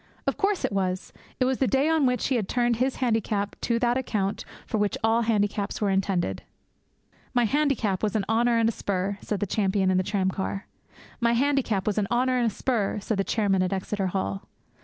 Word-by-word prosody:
Of - - 0
course 400 -2 0
it - - -2
was! 185 -2 -2 0.3
It 255 - +3
was 260 0 0
the 265 - +2
day 270 +4 +2
on 320 -4 +3
which 250 0 0
he 265 - +2
had 215 -5 -1
turned 240 -2 +1
his 260 +2 +1
handicap 220 -4 0
to 235 -1 +1
that 240 +1 +2
account 205 -6 -2 0.2
for 220 - -2
which 205 -1 0
all 225 +1 +3
handicaps 205 -2 0
were 205 -2 +1
intended. 190 - 0 0.9
'My 245 - +4
handicap 240 -6 +1
was 215 -1 -1
an 205 -3 +1
honour 235 +1 +2
and 230 -1 +3
a - - +2
spur!' 200 -1 -2
said 210 -1 -3
the - - +2
champion 195 -1 +1
in 185 - +2
the 185 - +2
tramcar. 195 0 -2 0.5
'My 235 0 +2
handicap 245 -6 +1
was 210 0 +1
an 200 - 0
honour 255 +1 +2
and 240 - +2
a 205 - -11
spur!' 220 -6 0
said 205 0 -2
the - - +3
chairman 195 -3 +1
at 185 - 0
Exeter 195 0 -1
Hall. 195 +1 -3
215 Hz, 210 wpm, -26 LUFS, 195-245 Hz, 0.9 s, My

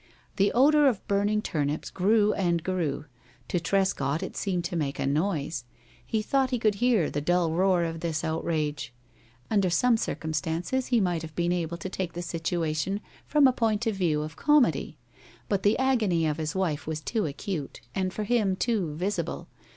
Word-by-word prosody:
The 200 +1 +3
odor 290 +4 +5
of 235 -7 0
burning 205 +1 +1
turnips 150 -1 -2
grew 210 +2 +3
and 170 -4 0
grew. 170 -6 -2 0.4
To 175 - +1
Trescott 165 -5 0
it - - -6
seemed 180 -4 -1
to 175 +1 -4
make 145 -4 -1
a - - -1
noise. 150 -1 -1 0.4
He 215 - -1
thought 265 +3 +1
he 250 - 0
could 220 -2 +2
hear 235 -9 +3
the 145 - -2
dull 175 +1 +2
roar 180 +1 +3
of 165 -1 -3
this 160 -2 -2
outrage. 155 -5 -2 0.6
Under 200 -4 +3
some 230 +7 +3
circumstances 165 - -2
he 240 -2 +3
might 175 -5 0
have 160 -1 -9
been 175 0 +1
able 170 -1 -2
to 170 - -5
take 185 -2 -4
the 175 - -5
situation 165 +2 -1 0.3
from 295 -1 +4
a 260 - +5
point 225 -1 0
of 225 - +1
view 160 -6 +1
of 155 +1 -7
comedy, 245 - +2 0.5
but 200 -2 0
the 205 +2 +3
agony 225 -11 +2
of 155 -1 0
his 155 +1 -3
wife 165 -6 -1
was 160 -1 -2
too 210 +4 -1
acute, 150 +1 -5
and, 185 -1 -1
for 215 - -3
him, 210 -4 +1
too 190 -8 -1
visible. 195 +6 -3
180 Hz, 180 wpm, -27 LUFS, 160-210 Hz, 0.6 s, odor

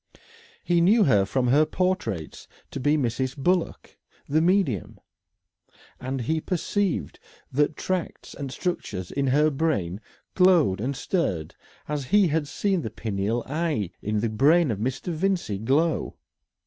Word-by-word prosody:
He 175 -1 +2
knew 210 +6 +5
her 105 - +4
from 125 +3 0
her 145 +5 +5
portraits 155 - -2 0.2
to - - -5
be 145 +4 +2
Mrs. 130 +1 -1
Bullock, 175 +5 -1 0.3
the 155 +3 +2
medium. 175 - +1 1.0
And 130 +1 -3
he 160 +6 -1
perceived 190 +2 -2 0.3
that 150 +3 +1
tracts 185 -3 -4
and 140 -2 -6
structures 105 - -4
in 140 -1 -1
her 150 +4 +3
brain 125 - -1 0.3
glowed 175 - +4
and 135 +4 -2
stirred 95 - -2 0.3
as 150 -2 -3
he 200 +4 +4
had 155 -1 0
seen 190 +4 0
the 110 - -4
pineal 110 +1 -2
eye 145 - -2
in 105 0 -1
the 115 - 0
brain 145 +7 +4
of 100 - -3
Mr. 130 +9 -3
Vincey 170 - -1
glow. 150 +9 0
145 Hz, 140 wpm, -25 LUFS, 115-170 Hz, 1.0 s, knew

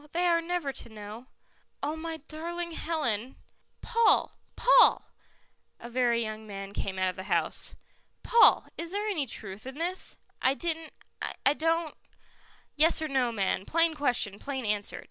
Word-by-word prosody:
They 350 +1 +1
are 340 -1 +3
never 335 -5 -2
to 235 - -7
know." 215 +3 -9 0.6
"Oh, 295 +2 -1
my 325 0 -4
darling 340 +2 -5
Helen 270 -8 -2 0.2
" - - -44
"Paul! 465 -1 +3 0.2
Paul!" - - +5 0.7
A 235 - -9
very 240 -1 +2
young 215 0 -6
man 195 -1 -7
came 190 -1 -3
out 185 0 +2
of 185 - -5
the 185 0 -7
house. - - +1 0.5
"Paul, 470 - +6
is 335 +2 -5
there 415 +1 -1
any 320 -10 -1
truth 210 +1 -5
in 265 +2 -7
this?" 355 +3 -2 0.2
"I 265 +1 +3
didn't 325 0 -3 0.5
I 275 - +6
don't 325 +1 0 0.4
" - - -30
"Yes 315 +3 +4
or 315 - -1
no, 260 -4 +1
man; 195 -3 0
plain 330 +6 +2
question, 245 -9 +1
plain 265 -3 -4
answer. 210 -1 -1
285 Hz, 165 wpm, -29 LUFS, 220-330 Hz, 0.7 s, Paul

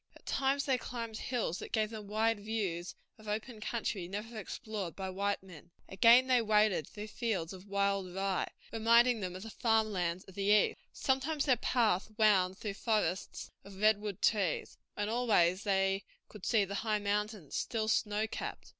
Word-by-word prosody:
At - - -18
times 275 +1 +1
they 265 -2 +1
climbed 230 -2 -5
hills 225 -9 -2
that - - -8
gave 215 0 0
them 215 -2 -7
wide 220 +1 +1
views 200 -5 -3 0.2
of 215 - -14
open 215 +2 -4
country 210 -5 -2
never 210 +5 -6
explored 215 -3 -5
by 190 -1 -4
white 200 +1 -1
men; 175 -3 -13 0.2
again 235 +5 +6
they 255 -2 +4
waded 210 -7 +3
through 210 0 -8
fields 200 -8 -2
of 190 +1 -11
wild 200 -2 0
rye, 195 -1 -1 0.2
reminding 230 +1 +4
them 185 -3 -4
of 185 - -7
the 225 - -8
farm 220 0 +2
lands 180 -1 -1
of 190 - -15
the 200 - -5
East; 210 +1 +4
sometimes 275 +3 0
their 260 -4 +4
path 225 -5 +1
wound 190 -4 +4
through 210 -2 -4
forests 195 -4 -1
of 195 -1 -12
redwood 210 -2 +1
trees, 195 -7 +1 0.2
and 205 - -1
always 210 -5 +2
they 195 0 +1 0.3
could 210 -4 -8
see 215 -4 +3
the 195 - -6
high 215 -2 +1
mountains, 205 -4 -2
still 220 -2 -1
snow 215 -1 +1
capped. 220 - -6
210 Hz, 175 wpm, -33 LUFS, 195-225 Hz, 0.3 s, again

